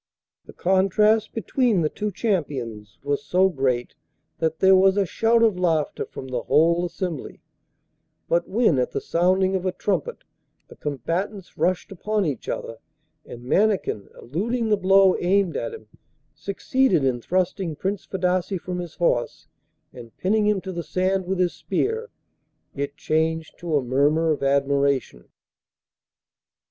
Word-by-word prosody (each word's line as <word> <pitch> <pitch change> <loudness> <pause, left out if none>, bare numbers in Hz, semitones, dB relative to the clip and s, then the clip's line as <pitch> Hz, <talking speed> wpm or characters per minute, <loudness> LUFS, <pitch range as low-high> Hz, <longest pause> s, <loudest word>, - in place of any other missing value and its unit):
The - - -13
contrast 205 +4 +2
between 230 -3 +1
the - - +3
two 210 +6 -4
champions 130 - -3
was 145 0 -1
so 185 +1 +3
great 130 -6 -1 0.5
that 160 -1 0
there 190 0 +6
was 190 +1 +4
a 200 - +3
shout 230 +5 +2
of 215 -5 +2
laughter 165 -4 0
from 130 - -9
the 125 -2 -2
whole 170 +3 +3
assembly; 170 -3 -6 0.8
but 170 +1 0
when 210 - +3
at 125 - -1
the - - -1
sounding 185 +2 +1
of 185 - -1
a 185 - 0
trumpet 210 - -2 0.5
the - - -13
combatants 170 - -4
rushed 185 +1 0
upon 210 +2 -1
each 140 -7 -4
other, 115 - -4 0.5
and 120 - -10
Mannikin, 190 - +1
eluding 220 - -2
the 210 - +4
blow 195 -1 +5
aimed 185 -1 +1
at - - -3
him, 450 - -10 0.5
succeeded 245 - +1
in 125 -2 0
thrusting 185 - -1
Prince 195 +5 -3
Fadasse 185 0 -1
from 180 +1 -5
his 175 -2 -7
horse 125 -9 0 0.5
and 115 -1 -12
pinning 210 +3 +1
him 210 -2 +1
to 190 - -6
the 170 -1 -4
sand 185 +2 -1
with 190 0 -1
his 180 -1 +1
spear, 450 +2 -2 0.6
it 140 +1 -4
changed 160 0 -1
to 170 -3 -2
a 140 - -1
murmur 145 +6 +2
of 150 - -1
admiration. 140 - +1
180 Hz, 150 wpm, -23 LUFS, 145-195 Hz, 0.8 s, there